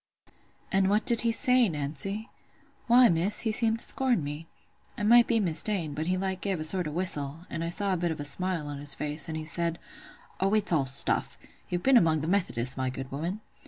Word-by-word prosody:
"And 190 Hz, 0 st, +2 dB
what 210 Hz, +1 st, +1 dB
did 235 Hz, -1 st, +3 dB
he 230 Hz, -, +1 dB
say, 250 Hz, -1 st, +4 dB
Nancy?" 155 Hz, -, -1 dB, 0.6 s
"Why, 245 Hz, +1 st, +6 dB
Miss, 175 Hz, +4 st, 0 dB
he 225 Hz, -, 0 dB
seemed 225 Hz, 0 st, +2 dB
to -, -, 0 dB
scorn 250 Hz, -, +1 dB
me. 150 Hz, +3 st, -7 dB, 0.5 s
I -, -, -5 dB
might 235 Hz, +2 st, +5 dB
be 230 Hz, -1 st, +1 dB
mista'en—but 165 Hz, -4 st, +1 dB
he 185 Hz, +1 st, 0 dB
like 190 Hz, 0 st, -3 dB
gave 195 Hz, -4 st, -2 dB
a -, -, -4 dB
sort 175 Hz, +1 st, +2 dB
of 150 Hz, -, -6 dB
a -, -, -9 dB
whistle, 160 Hz, -4 st, -1 dB
and 165 Hz, -, -4 dB
I 165 Hz, -, -3 dB
saw 200 Hz, +2 st, 0 dB
a -, -, -1 dB
bit 170 Hz, 0 st, -2 dB
of 160 Hz, -, -5 dB
a 145 Hz, -, -4 dB
smile 180 Hz, 0 st, -3 dB
on 145 Hz, -1 st, -7 dB
his 145 Hz, 0 st, -2 dB
face; 150 Hz, +1 st, -4 dB
and 160 Hz, -, -4 dB
he 155 Hz, -, -6 dB
said, 170 Hz, +1 st, -2 dB, 0.6 s
'Oh, 195 Hz, +2 st, +1 dB
it's 210 Hz, -3 st, +1 dB
all 140 Hz, -5 st, +1 dB
stuff! 135 Hz, +1 st, +1 dB, 0.3 s
You've 175 Hz, 0 st, -3 dB
been 265 Hz, -1 st, +5 dB
among 160 Hz, -6 st, +2 dB
the 155 Hz, -, -4 dB
Methodists, 135 Hz, -10 st, 0 dB
my 130 Hz, -1 st, -2 dB
good 130 Hz, +1 st, -8 dB
woman. 170 Hz, +9 st, -5 dB
175 Hz, 225 wpm, -27 LUFS, 150-210 Hz, 0.6 s, Why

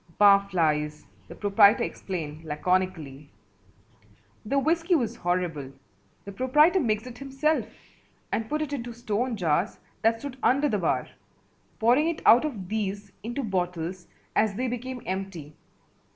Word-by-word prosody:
"Bar 200 Hz, -1 st, +6 dB
flies," 150 Hz, -4 st, 0 dB, 0.2 s
the -, -, -10 dB
proprietor 200 Hz, 0 st, +5 dB
explained 160 Hz, -4 st, -5 dB
laconically. 155 Hz, -3 st, -2 dB, 1.1 s
The 275 Hz, +6 st, -1 dB
whiskey 330 Hz, +5 st, +2 dB
was 235 Hz, -6 st, -1 dB
horrible. 170 Hz, -6 st, -2 dB, 0.5 s
The 200 Hz, -, -7 dB
proprietor 300 Hz, -, +4 dB
mixed 220 Hz, -, 0 dB
it 245 Hz, -1 st, -10 dB
himself 275 Hz, +3 st, 0 dB, 0.6 s
and 225 Hz, 0 st, -2 dB
put 305 Hz, +1 st, 0 dB
it 290 Hz, -1 st, -5 dB
into 240 Hz, -3 st, -4 dB
stone 235 Hz, +1 st, -2 dB
jars 175 Hz, +1 st, 0 dB, 0.2 s
that 225 Hz, +1 st, +3 dB
stood 270 Hz, +1 st, -7 dB
under 280 Hz, +3 st, +3 dB
the 210 Hz, -6 st, 0 dB
bar, 135 Hz, -7 st, 0 dB, 0.7 s
pouring 250 Hz, +8 st, +3 dB
it 335 Hz, -, -4 dB
out 245 Hz, +6 st, +7 dB
of 215 Hz, -12 st, -5 dB
these 205 Hz, -1 st, -3 dB
into 240 Hz, +6 st, -4 dB
bottles 180 Hz, -3 st, -3 dB, 0.3 s
as 215 Hz, -2 st, +2 dB
they 255 Hz, +4 st, -1 dB
became 250 Hz, +1 st, -5 dB
empty. 185 Hz, -6 st, -5 dB
210 Hz, 135 wpm, -26 LUFS, 180-255 Hz, 1.1 s, out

